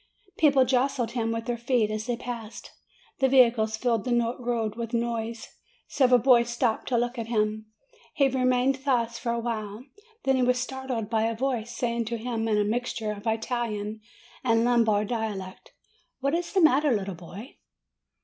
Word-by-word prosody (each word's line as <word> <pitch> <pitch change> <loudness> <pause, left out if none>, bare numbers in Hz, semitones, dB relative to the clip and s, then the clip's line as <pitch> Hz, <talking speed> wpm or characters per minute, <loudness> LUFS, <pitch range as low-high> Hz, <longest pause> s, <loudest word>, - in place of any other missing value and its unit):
People 275 -4 +5
jostled 255 -2 +1
him 230 -2 -1
with 230 0 -3
their 240 -1 -2
feet 235 -3 +1
as 215 +1 -4
they 240 -1 -1
passed; 230 -2 -7 0.5
the 265 - +3
vehicles 230 -4 +4
filled 230 -3 0
the 240 -1 +1
road 235 -3 -1
with 235 0 -4
noise; 230 -1 -2 0.4
several 255 -3 +4
boys 240 -1 +4
stopped 235 -1 -1
to 245 - +1
look 240 +1 -1
at 225 - -4
him. 215 -1 -1 0.5
He 275 - +4
remained 255 0 +1
thus 240 -4 0
for 235 - -2
a 235 - -1
while. 220 -1 -4 0.4
Then 270 -1 +2
he - - +1
was 250 0 +3
startled 255 -3 -3
by 220 0 +1
a 230 - -2
voice 240 -2 -2
saying 235 -1 -1
to 235 +1 -3
him 225 -1 -3
in 215 -1 +2
a 210 - +3
mixture 225 0 -2
of 210 +2 -7
Italian 220 -2 -2 0.4
and 230 -2 +3
Lombard 225 -4 +3
dialect, 210 -5 -5 0.5
"What 275 +2 0
is 340 +1 -1
the 385 - +2
matter, 295 -2 +4
little 200 -4 -1
boy?" 185 - -11
235 Hz, 175 wpm, -26 LUFS, 220-250 Hz, 0.5 s, People